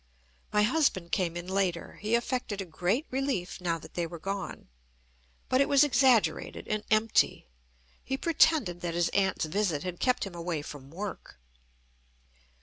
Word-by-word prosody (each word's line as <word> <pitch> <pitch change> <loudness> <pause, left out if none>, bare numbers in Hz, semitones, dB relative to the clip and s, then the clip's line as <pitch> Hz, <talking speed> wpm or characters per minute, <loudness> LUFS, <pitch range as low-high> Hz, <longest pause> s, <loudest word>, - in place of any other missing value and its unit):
My 210 0 +3
husband 215 - +1
came 175 -4 0
in 175 - -5
later. 185 -3 -1
He 215 +2 +1
affected 235 -3 -2
a 195 - -3
great 180 - -1
relief 260 -10 -2
now 170 -2 0
that 160 - -13
they 175 -1 -1
were 170 +1 -8
gone, 195 +3 -5 0.8
but 255 +1 +3
it 280 - +2
was 280 0 +6
exaggerated 260 -4 +2
and 215 0 -1
empty. 215 +1 +2 0.6
He 265 - -2
pretended 300 - +3
that 170 -1 -3
his 175 -1 +2
aunt's 190 -4 +1
visit 170 -2 0
had 180 -1 -5
kept 250 -1 +2
him 195 - -5
away 170 -3 -3
from 140 -2 -9
work. 190 - -7
195 Hz, 155 wpm, -29 LUFS, 175-245 Hz, 0.8 s, was